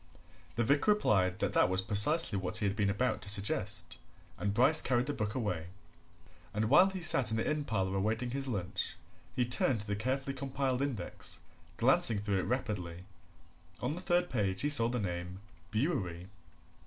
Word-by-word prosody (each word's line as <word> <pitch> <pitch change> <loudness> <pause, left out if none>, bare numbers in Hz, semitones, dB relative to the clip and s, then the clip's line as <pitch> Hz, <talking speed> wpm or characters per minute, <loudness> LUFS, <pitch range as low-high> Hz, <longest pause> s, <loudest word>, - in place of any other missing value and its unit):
The 120 - +1
vicar 145 - +1
replied 95 - +1
that - - -2
that - - +3
was 95 +1 0
precisely 105 - +5
what 95 +1 -1
he 110 - -1
had 100 0 -1
been 100 -2 0
about 110 +3 -1
to 100 - -4
suggest, 100 0 0 0.4
and 100 - -1
Bryce 130 +9 +5
carried 125 -1 0
the 145 - -3
book 105 -3 -3
away. 90 -10 -3 0.9
And 110 +2 -1
while 180 +6 +6
he 190 -1 -6
sat 130 -8 +5
in 110 - -1
the 115 - -1
inn 150 -1 -1
parlour 95 -4 -1
awaiting 110 +5 -1
his 135 +1 -3
lunch, 100 -8 -3 0.4
he 125 - +1
turned 120 -2 0
to - - -4
the 105 -1 -2
carefully 135 +5 -2
compiled 135 -1 -2
index, 140 -7 -3 0.4
glancing 115 - +3
it 100 - -6
through 100 -2 0
rapidly. 95 -8 -4 0.7
On - - -2
the 170 +4 -4
third 175 -1 0
page 95 -5 -1
he 145 - 0
saw 120 -6 +4
the 125 0 -2
name 90 -1 -5 0.3
Bewery. 95 - -2
110 Hz, 180 wpm, -32 LUFS, 100-135 Hz, 0.9 s, while